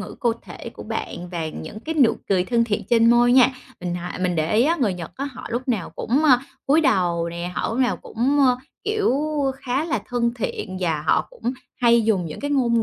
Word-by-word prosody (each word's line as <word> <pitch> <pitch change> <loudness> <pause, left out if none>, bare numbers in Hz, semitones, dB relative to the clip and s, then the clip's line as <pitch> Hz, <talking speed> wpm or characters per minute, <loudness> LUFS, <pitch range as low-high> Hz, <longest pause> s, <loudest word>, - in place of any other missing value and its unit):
ngữ 205 - -7
cơ 245 - +2
thể - - -9
của - - -9
bạn 175 +1 -5
và 165 -3 -3
những 160 +7 -8
cái 320 +6 -4
nụ 260 -7 +4
cười 185 -2 +2
thân 235 +3 +2
thiện 215 -3 -1
trên 230 -1 +5
môi 240 0 +5
nha. 255 -1 +7 0.3
Mình 175 -1 -3
hỏi 175 0 -5
mình 180 -1 +1
để 160 +5 0
ý 225 - +5
á, 330 +4 +2
người 210 -7 +2
Nhật 170 -2 -7
á 275 - -3
họ 255 -3 -7
lúc 245 +3 -3
nào 220 -8 -1
cũng, 260 +7 0
ơ, 255 -5 +6 0.3
cúi 295 +4 +5
đầu 180 - +1
nè, 170 +1 -5
họ - - -1
lúc 225 - -3
nào 255 -2 +2
cũng, 265 +6 -1
ơ, 255 -2 +5 0.3
kiểu, 425 - +1 0.5
khá 265 +3 -1
là 295 -10 -1
thân 240 -1 0
thiện 210 -4 -4
và 160 -4 0
họ 155 - +2
cũng 480 - -3 0.2
hay 235 -2 +4
dùng 200 -6 +1
những 155 - -7
cái 285 - -3
ngôn 235 -5 +2
235 Hz, 235 wpm, -23 LUFS, 180-260 Hz, 0.5 s, nha